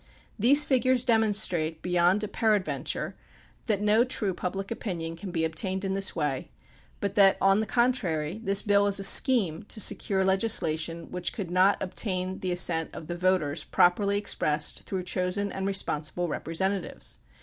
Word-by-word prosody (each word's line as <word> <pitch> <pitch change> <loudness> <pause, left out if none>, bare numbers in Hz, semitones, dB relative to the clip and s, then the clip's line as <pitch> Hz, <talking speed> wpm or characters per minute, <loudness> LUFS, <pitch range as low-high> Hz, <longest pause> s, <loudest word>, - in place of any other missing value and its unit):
These 280 +7 +6
figures 255 -2 +1
demonstrate 205 -9 +1
beyond 180 +3 +1
a - - -2
peradventure 210 -2 -2 0.5
that 210 -3 -1
no 215 +3 +3
true 220 -6 -2
public 195 +3 -5
opinion 170 -7 -5
can 185 +3 -9
be 165 -2 -2
obtained 185 +4 -3
in 190 - -2
this 195 -1 +1
way, 145 -4 -3 0.5
but 200 -1 -3
that 195 -2 +4
on 195 +1 +3
the 220 - -2
contrary 200 -8 -1
this 200 -2 +3
bill 205 -1 +2
is 200 - +3
a - - -4
scheme 195 -7 +5
to 220 - -2
secure 190 -1 +1
legislation 170 -5 +1
which 180 -1 -3
could 190 -5 -6
not 185 +3 +3
obtain 185 -1 -2
the 185 - -3
assent 170 -2 +2
of - - -9
the 175 - -6
voters 175 -4 0
properly 200 +3 +1
expressed 150 -7 -1
through 190 -2 -4
chosen 185 +3 -2
and 195 0 -4
respon 195 -6 -1
sible 175 +3 -2
representatives. 170 - -3
190 Hz, 160 wpm, -26 LUFS, 175-205 Hz, 0.5 s, These